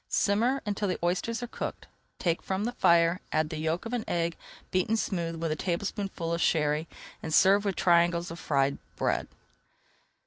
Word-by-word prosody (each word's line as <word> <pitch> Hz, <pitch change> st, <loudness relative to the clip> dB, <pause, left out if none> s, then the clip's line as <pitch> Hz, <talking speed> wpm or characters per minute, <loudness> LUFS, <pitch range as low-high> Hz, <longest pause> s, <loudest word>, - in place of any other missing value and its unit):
Simmer 235 Hz, +7 st, +2 dB
until 205 Hz, 0 st, -1 dB
the 180 Hz, -, -1 dB
oysters 225 Hz, +7 st, 0 dB
are -, -, -3 dB
cooked, -, -, -5 dB, 0.3 s
take 170 Hz, -2 st, 0 dB
from 190 Hz, +1 st, -2 dB
the 240 Hz, -, -1 dB
fire, 170 Hz, -5 st, +4 dB
add 155 Hz, 0 st, +1 dB
the 155 Hz, -, -3 dB
yolk 160 Hz, +5 st, -1 dB
of 230 Hz, -, -5 dB
an 240 Hz, -3 st, -1 dB
egg 170 Hz, -1 st, 0 dB, 0.4 s
beaten 185 Hz, +5 st, +1 dB
smooth 170 Hz, -6 st, -2 dB
with 165 Hz, -1 st, -1 dB
a -, -, 0 dB
tablespoonful 180 Hz, 0 st, -2 dB
of 170 Hz, -, -1 dB
Sherry, 150 Hz, 0 st, +2 dB, 0.3 s
and 160 Hz, -, -5 dB
serve 200 Hz, +5 st, +5 dB
with 195 Hz, -2 st, 0 dB
triangles 170 Hz, -1 st, +3 dB
of 170 Hz, -, -7 dB
fried 140 Hz, -3 st, +1 dB, 0.2 s
bread. -, -, 0 dB
175 Hz, 175 wpm, -29 LUFS, 165-200 Hz, 0.4 s, serve